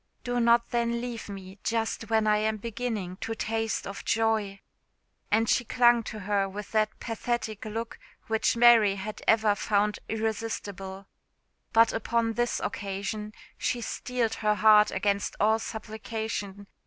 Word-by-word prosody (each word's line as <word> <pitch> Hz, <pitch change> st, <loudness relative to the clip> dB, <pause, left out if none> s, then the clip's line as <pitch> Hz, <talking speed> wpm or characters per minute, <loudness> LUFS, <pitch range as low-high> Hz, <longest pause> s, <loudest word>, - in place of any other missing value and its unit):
Do 245 Hz, 0 st, -1 dB
not 235 Hz, 0 st, +3 dB
then 235 Hz, 0 st, 0 dB
leave 235 Hz, -3 st, -6 dB
me 190 Hz, 0 st, -9 dB
just 225 Hz, -1 st, -1 dB
when 220 Hz, -1 st, +2 dB
I 210 Hz, 0 st, +4 dB
am 215 Hz, +1 st, 0 dB
beginning 215 Hz, -4 st, -4 dB
to 225 Hz, +2 st, -4 dB
taste 225 Hz, 0 st, -2 dB
of 195 Hz, -, -7 dB
joy!" 220 Hz, -3 st, 0 dB, 0.7 s
And 225 Hz, +2 st, +2 dB
she 245 Hz, -, +3 dB
clung 240 Hz, 0 st, +4 dB
to 215 Hz, -, -6 dB
her 200 Hz, 0 st, 0 dB
with 205 Hz, +1 st, -7 dB
that 215 Hz, -1 st, 0 dB
pathetic 225 Hz, -2 st, -3 dB
look 225 Hz, +2 st, -5 dB, 0.3 s
which 225 Hz, +1 st, +1 dB
Mary 230 Hz, -4 st, +6 dB
had 210 Hz, +2 st, -6 dB
ever 220 Hz, -2 st, +4 dB
found 205 Hz, 0 st, 0 dB
irresistble. 205 Hz, -3 st, -4 dB, 0.7 s
But 225 Hz, -1 st, +5 dB
upon 225 Hz, +1 st, 0 dB
this 240 Hz, +1 st, 0 dB
occasion 205 Hz, +1 st, -4 dB, 0.3 s
she 245 Hz, -, 0 dB
steeled 235 Hz, 0 st, -2 dB
her 210 Hz, -1 st, +2 dB
heart 210 Hz, 0 st, +6 dB
against 200 Hz, +1 st, -1 dB
all 220 Hz, +2 st, +3 dB
supplication. 220 Hz, -2 st, -5 dB
220 Hz, 140 wpm, -28 LUFS, 205-230 Hz, 0.7 s, Mary